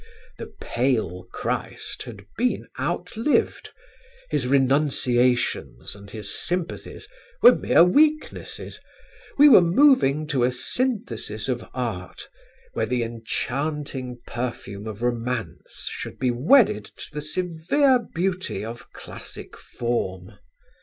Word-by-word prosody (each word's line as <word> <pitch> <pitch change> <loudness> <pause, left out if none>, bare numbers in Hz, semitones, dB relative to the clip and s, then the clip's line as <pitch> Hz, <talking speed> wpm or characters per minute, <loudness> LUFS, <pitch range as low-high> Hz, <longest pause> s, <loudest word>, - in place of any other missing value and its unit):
"The - - -7
pale 110 -8 -1
Christ - - -4
had 100 - -10
been 250 +3 0
outlived: 235 +7 0 0.6
his 125 - 0
renunciations 130 - +1
and 100 0 -13
his 105 -1 -5
sympathies 175 -1 -3 0.4
were 245 - +10
mere - - +5
weaknesses: 305 - +1 0.6
we 290 +1 +9
were 260 - +9
moving 170 - +4
to 135 -5 +1
a 125 - +3
synthesis 125 - -2
of 125 -3 -2
art 115 -8 -4 0.5
where - - -1
the 125 -1 0
enchanting 130 +3 -3
perfume 120 -4 -5
of 110 +1 -6
romance 120 -6 -3
should - - -6
be 130 -1 +1
wedded 130 - +4
to - - -12
the 150 - -4
severe 180 - +2
beauty 185 - -3
of 115 +1 -9
classic - - -9
form. 95 -6 -3
125 Hz, 110 wpm, -24 LUFS, 115-175 Hz, 0.6 s, were